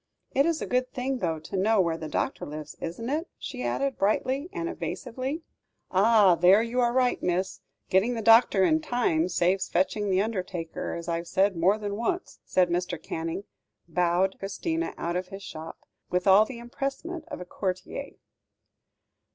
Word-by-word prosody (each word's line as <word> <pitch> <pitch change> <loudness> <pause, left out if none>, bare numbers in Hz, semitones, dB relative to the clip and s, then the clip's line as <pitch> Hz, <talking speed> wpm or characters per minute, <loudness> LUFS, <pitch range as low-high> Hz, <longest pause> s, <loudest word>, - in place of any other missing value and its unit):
It 275 +4 +3
is 330 -2 0
a - - -2
good 255 0 0
thing, 260 +1 -2
though, 165 -6 -1
to 195 - -7
know 210 +3 +3
where 170 -3 +2
the 160 -1 -6
doctor - - -2
lives, 150 0 -7
isn't 175 +8 -4
it?" 310 +6 -1
she - - -6
added, 265 - -1
brightly 260 - +1
and 335 - -3
evasively. 265 0 -4 0.5
"Ah! 200 0 +6
there 185 +5 +5
you 235 +2 -2
are 240 -1 +3
right, 250 0 +2
miss. 180 +2 -1 0.3
Getting 210 +6 +3
the 225 - -3
doctor 225 -3 +6
in 315 +10 +4
time 235 - +1
saves 185 +2 +1
fetching 200 +3 +1
the 185 -1 +3
undertaker, 185 -6 -3
as 170 0 -6
I've 170 0 -2
said 195 +2 +2
more 185 +5 +3
than 205 -1 -4
once," 345 +11 -2 0.2
and 180 -2 +4
Mr. 175 -1 -1
Canning 165 +3 -4 0.4
bowed 180 +3 +1
Christina 325 - -2
out 170 +1 -2
of 180 0 -2
his 195 +1 -9
shop, 160 -2 -8 0.3
with 180 0 0
all 200 +2 +7
the 245 +1 -8
empressement 275 +7 -5
of - - -6
a 180 - -7
courtier. 185 0 -4
195 Hz, 175 wpm, -27 LUFS, 180-250 Hz, 0.5 s, all